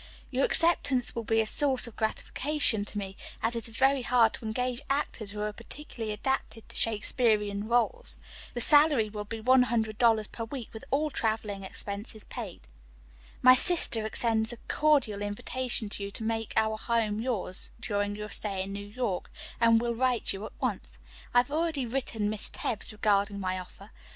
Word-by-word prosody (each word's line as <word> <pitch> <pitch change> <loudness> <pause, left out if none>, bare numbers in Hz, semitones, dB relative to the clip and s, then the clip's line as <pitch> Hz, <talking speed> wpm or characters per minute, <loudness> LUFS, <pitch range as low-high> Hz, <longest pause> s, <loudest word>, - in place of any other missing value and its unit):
Your 260 +1 +2
acceptance 280 -7 +4
will 230 - -3
be 225 0 +2
a - - -1
source 265 +3 +1
of 235 - -9
gratification 240 +1 0
to 210 - -8
me, 195 -1 -5 0.3
as 230 +1 +1
it 230 -1 -2
is 225 0 -6
very 270 0 +3
hard 240 -2 +3
to - - -9
engage 245 +3 -2
actors 275 -6 -2
who 210 +1 -6
are 210 0 -2
particularly 230 -1 -7
adapted 225 0 -3
to - - -11
Shakespearian 210 -2 +1
roles. 245 - 0 0.4
The 240 - 0
salary 290 -5 +7
will 210 -1 -6
be 225 +2 -6
one 255 +3 +5
hundred 225 -3 -1
dollars 225 -3 +4
per 230 +2 -7
week 240 0 -7
with 220 - -9
all 300 +3 0
traveling 215 -4 -1
expenses 200 +3 -4
paid. 220 -8 -8 0.8
"My 255 0 +9
sister 255 - +5
extends 220 0 +2
a 240 - -8
cordial 280 -10 +2
invitation 220 +3 -3
to 200 - -6
you - - -5
to 205 - -6
make 225 0 -3
our 220 0 +2
home 220 -3 -1
yours 220 -7 -1
during 205 -3 -2
your 210 0 -7
stay 195 -3 -1
in 195 +1 -7
New 200 0 -7
York, 205 -4 -3 0.3
and 230 -1 +5
will 235 0 -1
write 250 0 0
you 195 +1 -7
at - - -18
once. - - -3 0.3
I - - +1
have 245 +3 +3
already 310 -3 -1
written 230 -4 -2
Miss 215 0 0
Tebbs 225 -2 -3
regarding 205 -1 0
my 185 -1 -2
offer. 195 +3 -13
225 Hz, 180 wpm, -28 LUFS, 210-250 Hz, 0.8 s, My